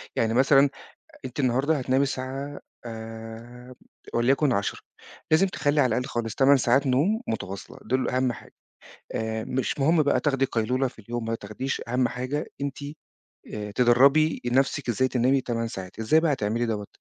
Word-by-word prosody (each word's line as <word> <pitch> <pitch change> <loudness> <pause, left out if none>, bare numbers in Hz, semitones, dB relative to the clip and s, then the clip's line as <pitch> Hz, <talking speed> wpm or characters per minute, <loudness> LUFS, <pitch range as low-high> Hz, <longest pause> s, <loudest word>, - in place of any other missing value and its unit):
يعني 115 0 +1
مثلًا 135 +3 +5 0.6
أنتِ 130 +2 -5
النهاردة 135 +4 +2
هتنامي 130 +1 +1
الساعة 135 +1 -4 0.3
آمم 115 +2 -9 0.4
وليَكُن 135 +4 +3
22:00، 100 -2 -1 0.5
لازم 160 +5 +5
تخلّي 145 -5 +1
على 130 - +4
الأقل 125 - 0
خالص 115 -2 -3
8 140 +1 +5
ساعات 130 +2 +2
نوم 155 - +2
متواصلة 100 -3 -5
دول 130 +3 0
أهَم 130 -1 +1
حاجة. 110 - -13 0.6
آآ 110 0 -2
مش 130 +2 -2
مهم 155 +3 +4
بقى 145 -1 +2
تاخدي 135 -3 +1
قيلولة 125 +2 0
في 125 - -18
اليوم 115 +2 -5
ما 115 0 -2
تاخديش، 115 +5 -4
أهَم 125 +1 +1
حاجة 130 +5 -3
أنتِ 140 -1 -3 0.8
آآ 105 -1 -5
تدرّبي 135 +7 +4
نَفْسِك 135 +2 +1
إزاي 120 +3 +2
تنامي 130 +2 +2
8 115 -2 -2
ساعات. 95 -2 -8
إزاي 115 +8 +4
بقى 160 -2 +2
هتعملي 115 -1 -1
دوّة؟ 105 -3 -3
125 Hz, 160 wpm, -26 LUFS, 115-140 Hz, 0.8 s, مثلًا